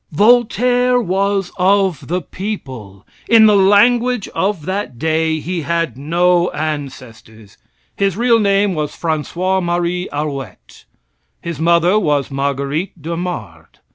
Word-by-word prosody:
Voltaire 245 +5 +3
was 195 -2 -1
of 190 -4 +1
the 180 +1 -2
people. 130 - -7 0.2
In 225 -1 +7
the 210 -1 +5
language 230 +4 +3
of 190 -5 -2
that 190 -8 -4
day, 160 +2 0
he 175 +2 -4
had 165 -4 -2
no 175 +5 +1
ancestors. 130 -8 -7 0.4
His 195 -2 -1
real 235 0 +3
name 200 -1 +2
was 150 -3 -4
Francois 175 +4 -1
Marie 175 +1 -2
Arouet. 140 -8 -6 0.5
His 170 -2 -6
mother 170 +4 +3
was 145 -7 0
Marguerite 140 +6 -3
d'Aumard. 165 - -6
175 Hz, 115 wpm, -17 LUFS, 150-200 Hz, 0.5 s, In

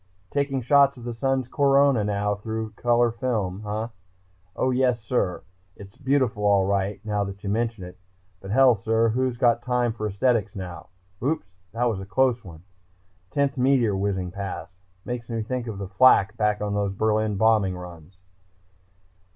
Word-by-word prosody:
Taking 140 -2 -1
shots 140 +1 +4
of 120 - -11
the 120 0 -4
sun's 130 +1 -1
corona 140 -3 +3
now 105 0 -1
with 110 -1 -4
color 120 0 +2
film... 110 -6 -2
huh? 110 +2 -3 0.7
Oh, 130 - +1
yes, 125 -2 +2
sir, 110 -5 -1 0.3
it's 100 -1 -13
beautiful 130 -6 0
all 100 -2 +4
right, 100 +1 -1
now 105 -1 0
that 100 0 -8
you 100 - -2
mention 115 -2 -1
it. 90 +1 -11 0.4
But, 95 - -10
hell, 130 +3 +5
sir, 115 +2 +1
who's 125 +1 -1
got 120 -1 +3
the 120 - -26
time 125 -2 +1
for 110 -1 -3
aesthetics 105 0 0
now?... 90 -3 -7 0.3
Oops, 150 +7 -1 0.3
that 115 +2 -1
was 110 -5 0
a 95 - -7
close 125 +2 +1
one! 85 -4 -12 0.7
Tenth 140 -2 0
meteor 125 -5 +3
whizzing 95 -2 -2
past. 100 -1 -6 0.3
Makes 120 -1 -5
me 115 -1 -2
think 125 +1 -4
of 105 -3 -5
flak 110 -1 +5
back 105 -2 0
on 105 -1 -2
those 100 -1 -1
Berlin 110 +1 0
bombing 105 -4 +3
runs." 90 0 -11
110 Hz, 165 wpm, -24 LUFS, 100-125 Hz, 0.7 s, hell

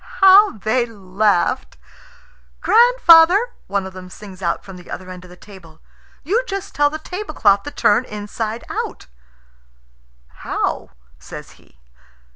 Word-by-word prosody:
How 390 - +6
they 235 +4 -1
laughed! 205 +2 -1 0.8
"Grandfather," 430 -3 +5 0.2
one 200 -1 -2
of 190 - -9
them 185 -1 -11
sings 195 -1 -12
out 170 -2 -2
from 195 -2 -11
the 180 - -15
other 185 0 -8
end 180 0 -10
of - - -16
the 180 - -14
table, 175 -5 -16 0.4
"you 430 - 0
just 395 0 -6
tell 290 0 +2
the 310 - -6
tablecloth 310 - 0
to 290 - -7
turn 220 0 +1
inside 215 +2 -6
out," - - -5 1.3
"How?" - - -3 0.3
says - - -11
he. - - -24
215 Hz, 135 wpm, -19 LUFS, -, 1.3 s, How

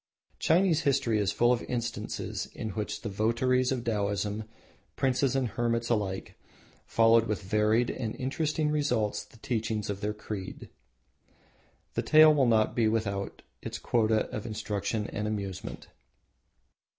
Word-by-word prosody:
Chinese 165 -1 +3
history 130 -6 +2
is 100 -5 +1
full 120 +1 +3
of 120 - -1
instances 120 -1 -3
in 110 - -4
which 105 +1 -4
the - - -3
votaries 120 +5 +1
of 125 -3 -1
Taoism, 105 -1 -1 0.5
princes 135 0 +1
and 130 -3 +1
hermits 115 +2 -1
alike, 100 -4 -1 0.5
followed 115 0 +4
with 105 -1 -2
varied 105 +4 +2
and 110 -3 -4
interesting 150 +3 -1
results 115 -9 0
the 105 - -19
teachings 110 -3 -2
of 100 0 -6
their 105 0 -2
creed. 105 -3 -7 1.2
The - - 0
tale 155 0 +7
will 140 -4 +3
not 110 -2 +3
be 115 -2 +3
without 100 -3 -2 0.2
its - - -5
quota 110 -2 +1
of 110 - -4
instruction 105 0 -2
and 105 +1 -3
amusement. 100 -3 -5
115 Hz, 140 wpm, -29 LUFS, 105-125 Hz, 1.2 s, tale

